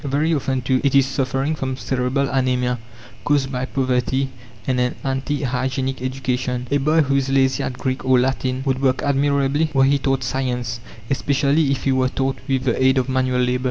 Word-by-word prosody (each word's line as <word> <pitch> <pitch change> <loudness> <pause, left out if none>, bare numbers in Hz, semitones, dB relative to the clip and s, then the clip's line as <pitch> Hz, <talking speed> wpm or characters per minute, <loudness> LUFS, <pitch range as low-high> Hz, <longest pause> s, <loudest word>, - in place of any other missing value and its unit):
Very 145 +4 +1
often, 135 -3 -1
too, 130 0 +1
it 140 -1 +2
is 135 -1 +6
suffering 135 +2 -1
from 130 -4 -3
cerebral 130 +1 0
anæmia, 125 -2 0 0.4
caused 140 -2 +1
by 125 -1 -2
poverty 130 0 0 0.3
and 130 -1 0
an 125 0 0
anti 135 +2 -2
hygienic 130 0 -2
education. 125 -1 -2
A 145 - +3
boy 155 +4 +3
who 140 -2 +1
is 135 -1 0
lazy 135 -1 +2
at - - -2
Greek 130 0 -2
or 130 -1 +4
Latin 130 0 -1
would 135 -1 0
work 130 -1 +1
admirably 140 +2 +1
were 135 - +5
he 140 +1 +3
taught 135 -1 0
science, 125 -2 -2 0.3
especially 140 +2 +2
if 135 -2 -1
he 135 - +2
were 130 -1 +2
taught 135 0 -2
with 135 -2 0
the 130 0 0
aid 130 +1 +4
of 130 0 0
manual 130 -1 +1
labour. 125 0 +1
130 Hz, 195 wpm, -21 LUFS, 130-140 Hz, 0.4 s, is